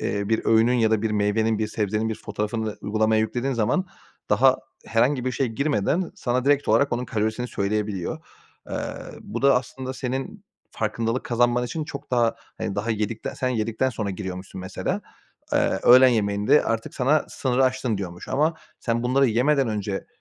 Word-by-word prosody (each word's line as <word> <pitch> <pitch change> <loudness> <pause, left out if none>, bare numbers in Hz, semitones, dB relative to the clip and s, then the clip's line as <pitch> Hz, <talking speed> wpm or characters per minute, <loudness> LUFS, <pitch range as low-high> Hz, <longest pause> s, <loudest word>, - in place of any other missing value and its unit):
eee, 100 0 -2
bir 110 - +1
öğünün 115 +2 +4
ya 115 -2 +3
da 110 -1 +2
bir 110 - 0
meyvenin, 105 +1 +1
bir 110 - 0
sebzenin 110 +1 -1
bir 110 - -2
fotoğrafını 105 +1 -3
uygulamaya 110 +1 +2
yüklediğin 120 +5 -1
zaman, 125 - +1 0.4
daha - - +5 0.3
herhangi 125 +3 +2
bir 130 - -1
şey 135 - 0
girmeden 140 - 0
sana 125 0 -1
direkt 145 0 +2
olarak 140 -2 +3
onun 125 +1 -1
kalorisini 110 +2 -2
söyleyebiliyor. 100 -2 -2 0.5
Eee, - - -3 0.5
bu - - -6
da 140 -2 +6
aslında 130 +1 -4
senin 135 - -4 0.3
farkındalık 115 +3 -2
kazanman 120 0 +2
için 150 +6 -3
çok 140 -3 -8
daha, 120 -2 +2 0.2
hani, 95 - -3
daha 110 +3 -1
yedikte 110 +1 -2
sen 130 - 0
yedikten 115 +2 0
sonra 105 -4 -3
giriyormuşsun, 95 -1 -6
mesela. 95 - -3 0.5
Eee, - - +4 0.2
öğlen 130 +2 +8
yemeğinde 105 +3 +3
artık 115 -1 -2
sana 140 +4 +2
sınırı 130 0 +1
aştın 125 -4 0
diyormuş 90 -2 -7
ama 155 +4 +2 0.3
sen 115 0 -1
bunları 130 +3 +3
yemeden 130 +3 +2
önce 100 -2 -3
115 Hz, 165 wpm, -24 LUFS, 105-130 Hz, 0.5 s, öğlen